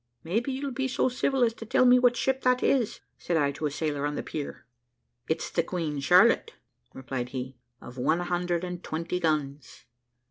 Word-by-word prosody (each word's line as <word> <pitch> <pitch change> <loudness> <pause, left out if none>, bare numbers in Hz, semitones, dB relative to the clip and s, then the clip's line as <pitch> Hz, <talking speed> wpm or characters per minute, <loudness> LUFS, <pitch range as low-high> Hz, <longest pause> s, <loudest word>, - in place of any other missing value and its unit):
`Maybe 220 +10 -1
you'll 270 +1 -3
be 265 +1 -1
so 260 0 +1
civil 255 +1 +1
as 230 -1 +2
to 230 - -9
tell 225 +3 +3
me 250 0 +7
what 245 -1 +3
ship 265 +1 0
that 250 0 +2
is,' 245 -6 +1 0.2
said 170 - -1
I 145 -2 +2
to 150 +2 -3
a - - -2
sailor 145 0 -2
on 145 - -3
the - - -3
pier. 145 -2 -6 0.6
`It's 160 - -2
the 170 - +2
Queen 165 -4 -3
Charlotte,' 140 - +4 0.4
replied 130 -2 -5
he, 130 -1 -6 0.2
`of 125 +1 -10
one 155 +7 +1
hundred 175 0 -1
and 180 0 -5
twenty 165 +3 -3
guns.' 150 -5 -2
170 Hz, 190 wpm, -27 LUFS, 145-245 Hz, 0.6 s, me